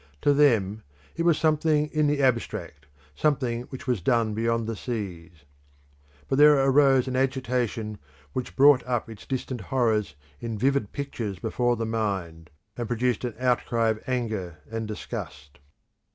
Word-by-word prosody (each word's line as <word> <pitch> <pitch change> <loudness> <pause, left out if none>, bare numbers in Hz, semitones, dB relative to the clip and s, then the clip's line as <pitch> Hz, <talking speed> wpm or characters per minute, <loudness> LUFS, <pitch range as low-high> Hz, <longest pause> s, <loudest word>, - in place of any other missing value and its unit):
To 145 - +4
them 110 -8 +3 0.3
it 170 - -1
was 170 -3 +4
something 155 -1 +2
in 155 -1 +2
the 145 -1 +1
abstract, 125 -3 -1 0.3
something 125 - 0
which 130 - -8
was 125 -7 0
done 115 +2 +2
beyond 115 +1 0
the 115 0 -3
seas. 90 - -6 0.8
But 135 - 0
there 150 0 +8 0.2
rose 135 -2 +4
an 130 - -2
agitation 125 -5 -1 0.3
which 130 - -4
brought 140 -1 +6
up 120 -2 -2
its 110 - -12
distant 130 -2 -3
horrors 110 - 0 0.2
in 115 -2 -4
vivid 135 -2 +1
pictures 120 -8 -4
before 120 +4 0
the 115 0 -3
mind, 95 -8 -3 0.3
and 120 -2 -4
produced 120 0 0
an 120 - -4
outcry 120 -2 +1
of 110 0 -2
anger 110 -9 -2
and 115 -1 -3
disgust. 70 -8 -7
120 Hz, 150 wpm, -26 LUFS, 110-130 Hz, 0.8 s, there